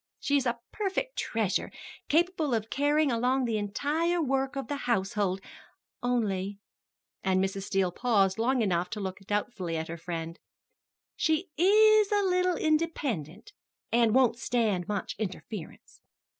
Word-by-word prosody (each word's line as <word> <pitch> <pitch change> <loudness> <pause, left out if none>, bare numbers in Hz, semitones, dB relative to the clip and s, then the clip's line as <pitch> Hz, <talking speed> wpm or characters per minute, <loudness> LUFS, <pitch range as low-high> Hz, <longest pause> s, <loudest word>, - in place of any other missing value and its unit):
She 285 - 0
is 270 -2 +2
a 240 0 0 0.2
perfect 425 +5 -2
treasure, 220 -4 -1 0.4
capable 320 -4 +2
of 220 0 -3
carrying 290 +1 +2
along 250 +3 +1
the 225 -2 0
entire 300 - 0
work 270 -2 0
of 275 - -4
the 290 - -2
household, 195 -3 0 0.6
only" 205 -5 -1 0.7
and 190 -1 +2
Mrs. 195 0 -1
Steele 190 -2 +1
paused 200 -2 +2
long 250 +1 +2
enough 180 -3 0
to 215 - -5
look 190 -1 -4
doubtfully 205 -5 -2
at 160 0 -4
her 170 - -5
friend 165 0 -5 0.8
"she 320 +4 0
is 425 +4 +5
a 410 -1 +3
little 365 -1 +2
independent, 290 - -1 0.4
and 235 -1 +3
won't 245 -2 +4
stand 215 -8 0
much 205 -2 -3
interference." 195 -2 -7
235 Hz, 140 wpm, -29 LUFS, 195-300 Hz, 0.8 s, is